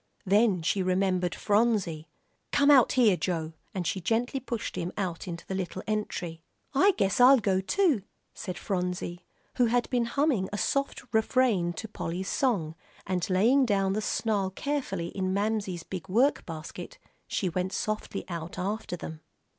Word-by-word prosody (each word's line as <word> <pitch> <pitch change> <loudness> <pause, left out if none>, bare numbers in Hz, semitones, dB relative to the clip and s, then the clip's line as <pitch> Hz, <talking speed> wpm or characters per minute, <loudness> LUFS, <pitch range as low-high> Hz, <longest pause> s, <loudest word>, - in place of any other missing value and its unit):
Then 200 -2 +3
she 195 +4 +1
remembered 185 -1 +1
Phronsie. 205 -7 +1 0.4
"Come 285 +1 +5
out 265 -4 +6
here, 230 -7 +5
Joe," 165 -1 -2 0.2
and 185 -2 -3
she 190 - -1
gently 235 - 0
pushed 240 -3 -4
him 175 +1 -3
out 180 -4 -3
into 170 -1 -6
the - - -5
little 190 0 -4
entry. 180 -6 -3 0.3
"I 385 +9 +5
guess 195 +2 +1
I'll 265 +2 +9
go, 195 -4 +1
too," 310 - +2 0.3
said 185 - -6
Phronsie, 180 -2 -3 0.3
who 245 - +5
had 240 +1 +1
been 245 -2 +2
humming 250 -6 +1
a 205 - -3
soft 275 +6 -1
refrain 220 -6 +2
to 220 +7 -6
Polly's 185 -2 -4
song, 195 - 0 0.3
and 180 0 -1
laying 230 +9 +4
down 195 -5 +1
the 215 - -1
snarl 210 -3 0
carefully 195 -7 -3
in 185 0 -2
Mamsie's 200 -4 -1
big 185 +1 -7
work 250 +9 +2
basket 165 - -7 0.3
she 190 - -1
went 180 +2 -1
softly 215 -1 -3
out 170 -1 -6
after 195 0 -3
them. 160 -1 -8
195 Hz, 160 wpm, -28 LUFS, 180-235 Hz, 0.4 s, I'll